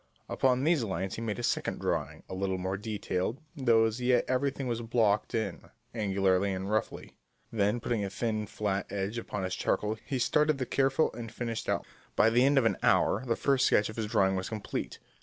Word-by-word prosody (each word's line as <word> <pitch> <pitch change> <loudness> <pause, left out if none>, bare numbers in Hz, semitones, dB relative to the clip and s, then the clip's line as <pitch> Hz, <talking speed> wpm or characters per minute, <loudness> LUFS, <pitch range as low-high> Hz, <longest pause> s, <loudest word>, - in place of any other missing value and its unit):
Upon 130 0 +2
these 160 -4 +3
lines 95 -2 -3
he - - -5
made 110 -2 -2
a 120 - -5
second - - -1
drawing - - -2
a - - -7
little 95 0 -1
more 95 +1 -2
detailed, 105 +2 -3 0.2
though 120 -6 +4
as 110 +2 -2
yet 125 0 +3
everything 135 +1 0
was 120 -2 -2
blocked 115 -3 +1
in, 110 -1 -3 0.2
angularly 100 -3 +1
and 95 +2 -4
roughly. 110 - -2 0.3
Then, 105 +1 +1
putting 115 -2 -1
a 100 - -2
thin 110 -1 -2
flat 100 -1 -2
edge 100 +3 -2
upon 105 -3 -4
his 95 0 -2
charcoal, 110 +1 -1
he 135 - -2
started 150 +4 +2
the 130 - -2
careful 135 +4 +2
and 115 -1 -7
finished 115 -1 -4
outline. - - 0 0.3
By 110 - +5
the 120 +2 +4
end 140 +1 +3
of 130 - +4
an 115 - +2
hour - - +3
the 115 - +2
first 135 -2 +2
sketch 105 - +3
of 110 - -7
his 110 -2 -2
drawing 95 -2 +2
was 95 0 -3
complete. 110 -3 -4
110 Hz, 205 wpm, -30 LUFS, 100-125 Hz, 0.3 s, By